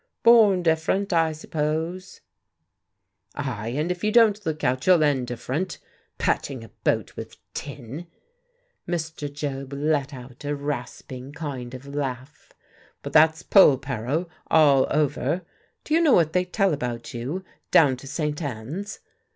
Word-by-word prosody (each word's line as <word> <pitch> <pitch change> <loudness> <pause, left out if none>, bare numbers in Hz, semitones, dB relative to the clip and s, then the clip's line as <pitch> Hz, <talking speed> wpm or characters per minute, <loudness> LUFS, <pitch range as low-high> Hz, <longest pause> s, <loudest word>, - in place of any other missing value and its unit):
"Born 215 -6 +6
different, 170 +4 +1
I 165 -1 +3
suppose." 160 +3 -3 1.1
"Ay, 115 -6 -4
and 155 +4 0
if 180 +1 -5
you 215 - +2
don't 215 -2 +4
look 155 -1 -3
out 130 +4 0
you'll 180 -4 +6
end 135 -4 +1
different. 140 +9 -3 0.4
Patching 130 -5 -1
a 115 - -12
boat - - -1
with - - -8 0.2
tin!" 140 +3 -7 0.8
Mr. 160 -4 -3
Job 140 -1 -5
let 145 0 0
out 125 -1 -11
a 145 0 -1
rasping 135 -1 -6
kind 130 -5 -6
of 130 +2 -10
laugh. 140 -1 -5 0.5
"But - - -6
that's 160 +1 +5
Polperro, 140 - +3 0.2
all 145 -4 +5
over. 150 +3 0 0.4
Do 305 - -3
you 330 - +5
know 310 -6 +5
what 160 -2 +4
they 180 0 +2
tell 195 -1 +1
about 120 -4 -4
you, 135 +11 -4 0.3
down 140 -5 +5
to 135 - -11
St. 150 +2 -2
Ann's?" 145 - -5
150 Hz, 140 wpm, -24 LUFS, 135-175 Hz, 1.1 s, Born